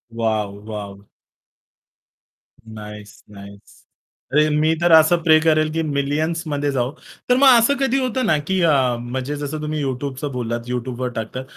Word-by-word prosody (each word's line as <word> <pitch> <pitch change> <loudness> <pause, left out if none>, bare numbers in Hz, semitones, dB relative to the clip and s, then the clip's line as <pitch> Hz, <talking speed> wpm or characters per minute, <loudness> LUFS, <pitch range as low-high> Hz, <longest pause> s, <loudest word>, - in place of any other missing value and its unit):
Wow, 110 -3 -1
wow. 100 -2 -8 1.6
Nice, 105 -1 -11
nice. 100 0 -14 0.5
अरे 150 +1 +4
मी 155 +2 +2
तर 175 - +3
असं 160 +2 +6
प्रे 155 -1 +5
करेल, 155 -1 +2
की 165 - -1
मिलियन्स 155 +3 -1
मध्ये 145 -1 -1
जाऊ. 125 -1 -1 0.4
तर 250 - +5
मग 275 +1 +5
असं 235 +5 +2
कधी 270 0 +1
होतं 255 0 -1
ना - - +3
अ, 150 - +1
की 190 0 0 0.5
म्हणजे 130 +3 -3
जसं 145 +1 -5
तुम्ही 150 0 -3
YouTubeच 135 +1 -4
बोललात, 120 -1 -3
YouTubeवर 125 0 -3
टाकतात 115 +3 -5
140 Hz, 150 wpm, -20 LUFS, 115-155 Hz, 1.6 s, असं